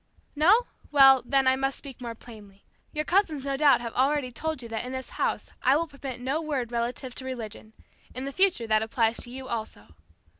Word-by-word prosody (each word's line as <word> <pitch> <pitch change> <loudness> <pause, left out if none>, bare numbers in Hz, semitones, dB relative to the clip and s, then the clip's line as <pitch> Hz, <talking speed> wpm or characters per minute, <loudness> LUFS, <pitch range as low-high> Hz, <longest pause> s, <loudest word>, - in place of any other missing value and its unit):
"No? 375 +11 +5 0.3
Well, 270 -2 +7
then, 275 -1 +3
I 260 - +5
must 270 0 -1
speak 270 -3 -11
more 235 -1 -5
plainly. 210 -4 -14 0.3
Your 305 0 -3
cousins 325 -7 +1
no 275 -1 -1
doubt 285 -2 +4
have 235 -1 -5
already 270 0 +1
told 310 +1 -4
you 230 - -8
that 225 -1 -3
in 250 +1 -6
this 260 0 -6
house - - -2
I 265 +2 +4
will 330 +3 +1
permit 280 -5 -8
no 270 +6 -1
word 275 -7 -3
relative 240 +2 -3
to 260 - -6
religion. 220 -4 -7 0.4
In 255 +1 -4
the 275 - -4
future 370 -7 +3
that 215 -1 +2
applies 225 +1 +1
to - - -4
you 260 +1 -8
also." 225 - -5
260 Hz, 210 wpm, -27 LUFS, 235-285 Hz, 0.4 s, Well